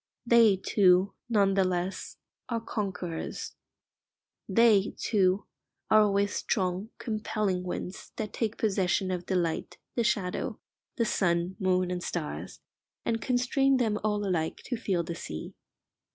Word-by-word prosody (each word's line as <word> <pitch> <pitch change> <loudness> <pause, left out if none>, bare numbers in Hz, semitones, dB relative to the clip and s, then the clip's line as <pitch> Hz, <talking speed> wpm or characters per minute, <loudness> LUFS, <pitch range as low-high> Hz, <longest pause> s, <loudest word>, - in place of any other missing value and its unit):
They, 235 -4 +6
too, 185 0 +3 0.2
none 200 -4 +3
the 195 0 +3
less, 185 +1 -2 0.3
are 230 -1 0
conquerors. 190 -7 -4 1.0
They, 210 -1 +4
too, 195 -2 +2 0.5
are 215 - +8
always 200 -1 +2
strong, 190 +1 -1
compelling 215 -4 -1
winds 180 +1 -5
that 215 -2 -4
take 225 -2 -2
possession 190 -2 +1
of 180 -1 -4
the 190 - 0
light, 170 -3 -1 0.2
the 235 - +1
shadow, 200 -5 -1 0.4
the 230 - +1
sun, 175 -2 +1
moon, 185 -2 +1
and 180 -1 -2
stars, 170 -4 -5 0.4
and 225 -1 0
constrain 260 +3 +2
them 220 -4 +1
all 210 -1 0
alike 160 -4 -1
to 250 - -2
feel 190 -6 -1
the 170 - -4
sea. 80 - -7
195 Hz, 135 wpm, -29 LUFS, 180-220 Hz, 1.0 s, are